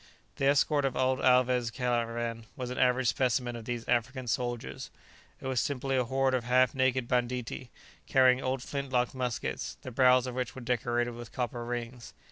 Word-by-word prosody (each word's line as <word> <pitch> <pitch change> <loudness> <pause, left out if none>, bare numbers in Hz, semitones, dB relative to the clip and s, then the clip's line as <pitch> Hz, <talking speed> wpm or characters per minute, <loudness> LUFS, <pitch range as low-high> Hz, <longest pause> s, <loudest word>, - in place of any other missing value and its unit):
The 135 - +1
escort 145 +1 +3
of 135 - -1
old 130 0 +1
Alvez' 125 -2 +3
caravan 115 -1 -2
was 125 -1 -5
an 125 - -4
average 125 0 +3
specimen 125 -1 0
of 115 -2 -8
these 120 -1 -4
African 125 +2 0
soldiers. 120 0 -3 0.5
It - - -11
was 130 -2 +1
simply 135 -1 -1
a 125 -1 +2
horde 135 +2 +1
of 125 -2 +1
half 125 +1 +3
naked 130 -2 +1
banditti, 125 0 -2 0.4
carrying 130 -1 +5
old 130 -1 -2
flint 140 0 -4
locked 125 -1 +1
muskets, 125 -3 -3
the 130 - -6
barrels 125 0 +5
of 125 - -4
which 125 -1 -3
were 130 - -7
decorated 120 0 0
with 120 -1 -9
copper 120 -1 -3
rings. 120 0 -6
125 Hz, 180 wpm, -30 LUFS, 120-130 Hz, 0.5 s, carrying